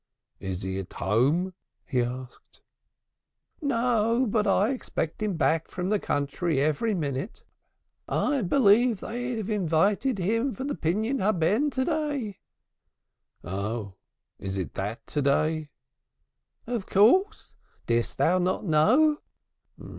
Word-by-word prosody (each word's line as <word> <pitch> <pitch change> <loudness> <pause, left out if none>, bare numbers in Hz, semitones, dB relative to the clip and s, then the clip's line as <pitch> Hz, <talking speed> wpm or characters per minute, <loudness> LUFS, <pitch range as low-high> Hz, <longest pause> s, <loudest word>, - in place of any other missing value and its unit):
"Is 95 -1 -5
he 95 0 -3
at 95 - -8
home?" 140 - +1 0.3
he 125 -4 0
asked. 125 +1 -7 1.0
"No, 235 -3 +2
but 210 0 +1
I 200 +2 +3
expect 215 -11 -4
him 210 -4 -1
back 160 +2 +1
from 180 +1 -3
the 210 -1 +2
country 145 +1 -1
every 155 +10 +1
minute. 145 - -4 0.7
I 285 -3 +1
believe 230 +1 +4
they 245 +3 -4
have 215 -1 -3
invited 200 - +1
him 230 +8 0
for 260 - -5
the 285 +1 -2
Pidyun 220 - -1
Haben 210 - +2
to 260 -1 -1
day." 290 - -2 1.0
"Oh, 100 +3 -4 0.5
is 95 0 -4
that 100 - -4
to 150 - -2
day?" 155 +2 +1 1.0
"Of 230 -4 -3
course. 370 - +3 0.3
Didst 115 0 0
thou 180 +2 +3
not 185 +3 -1
know?" 255 - +4
190 Hz, 120 wpm, -27 LUFS, 140-235 Hz, 1.0 s, believe